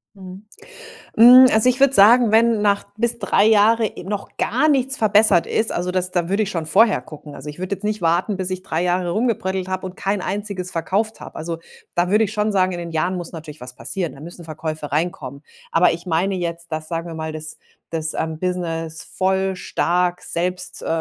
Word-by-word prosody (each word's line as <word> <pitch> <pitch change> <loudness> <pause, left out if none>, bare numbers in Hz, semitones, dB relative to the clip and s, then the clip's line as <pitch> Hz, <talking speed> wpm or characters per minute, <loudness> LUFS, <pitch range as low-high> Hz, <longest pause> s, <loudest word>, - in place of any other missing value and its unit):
Mhm. 190 +1 -11 0.7
Hm, 250 +3 +9
also, 220 +3 +3
ich 255 0 +1
würde 275 -1 +4
sagen, 225 +2 +6
wenn 225 -1 +3
nach 200 -1 +1
bis 235 +1 0
3 - - +2
Jahre, 220 +1 +4
äh, - - -8
noch 200 +2 -6
gar 260 +8 +1
nichts 265 -2 +2
verbessert 210 -4 +4
ist, 220 - 0
also, 180 +1 -2
das 180 0 0
da 175 -2 -1
würde 200 +3 +1
ich 205 - -3
schon 165 -5 -4
vorher 210 +6 +4
gucken. 150 -1 -12
Also, 145 +3 -9
ich 150 +4 -9
würde 185 +2 -3
jetzt 195 - -12
nicht 215 -2 -2
warten, 175 +5 +1
bis 185 -1 -3
ich 185 0 -4
3 165 -2 -2
Jahre 180 0 0
rumgebröddelt 190 -4 -1
habe 185 0 -3
und 185 - -8
kein 195 0 -2
einziges 195 -2 -4
verkauft 200 +7 -2
habe. - - -10
Also, 165 +1 -5 0.4
da 175 +1 0
würde 215 +2 +4
ich 210 - -5
schon 210 -1 0
sagen, 185 -2 +1
in 175 - -5
den 170 -1 -6
Jahren 165 +3 -1
muss 175 -2 -6
natürlich 155 -3 -10
was 125 0 -8
passieren, 180 -5 -3
da 135 - -14
müssen 170 +1 -10
Verkäufe 155 -1 -6
reinkommen. 150 -3 -3 0.3
Aber 170 +2 +4
ich 170 +2 -7
meine 180 +4 0
jetzt, 170 -2 -5
dass 155 0 -4
sagen 165 0 -4
wir 165 - -7
mal, 160 0 -5
das 155 0 -5 0.3
das, 160 -1 -3
ähm, 160 -1 -3
Business 165 -3 -3
voll 190 0 -1
stark 180 0 -1
selbst, 180 +1 -3
äh, - - -7
185 Hz, 215 wpm, -20 LUFS, 165-210 Hz, 0.7 s, Hm